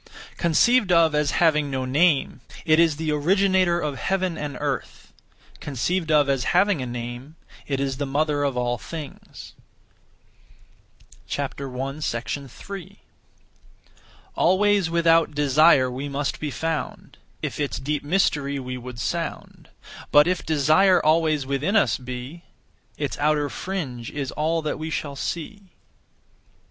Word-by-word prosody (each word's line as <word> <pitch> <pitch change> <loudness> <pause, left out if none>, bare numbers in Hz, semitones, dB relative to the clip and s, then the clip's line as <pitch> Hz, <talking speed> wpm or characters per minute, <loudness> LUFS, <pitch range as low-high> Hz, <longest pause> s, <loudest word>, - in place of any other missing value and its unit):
(Conceived 195 +6 +3
of 165 -2 +4
as) 150 -1 +1
having 150 -4 +2
no 130 -1 -2
name, 140 -1 +2 0.2
it 155 -1 +4
is 165 -3 +4
the 155 0 -2
Originator 185 +3 +2
of 145 -5 -3
heaven 185 -3 -1
and 145 -4 -5
earth; - - -4 0.5
(conceived 160 +5 -2
of 150 -2 +4
as) 135 -3 +1
having 190 -4 +3
a 125 - -4
name, 120 +5 -7 0.3
it 135 -2 -1
is 135 -1 -2
the 145 0 -3
Mother 145 +1 0
of 140 -3 -1
all 120 0 -1
things. 155 -4 -9 1.8
3. 140 - -5 1.4
Always 195 0 +3
without 165 -2 +3
desire 145 -2 +4
we 135 +3 -5
must 140 +1 -3
be 150 - -3
found, 160 +1 -4 0.2
If - - -4
its 145 -2 -2
deep 145 +2 -3
mystery 145 -4 +1
we 130 -1 -5
would 125 0 -9
sound; - - -4 0.4
But 145 0 +7
if 180 0 -1
desire 160 +5 +4
always 155 -2 +2
within 140 +9 -1
us 220 - +3
be, 125 +6 -8 0.5
Its - - -3
outer 150 -1 +1
fringe 140 -12 -5
is 140 -2 -4
all 160 +1 -1
that 150 - -3
we 160 +1 -4
shall 145 -2 -4
see. 185 +6 -6
150 Hz, 130 wpm, -24 LUFS, 135-170 Hz, 1.8 s, But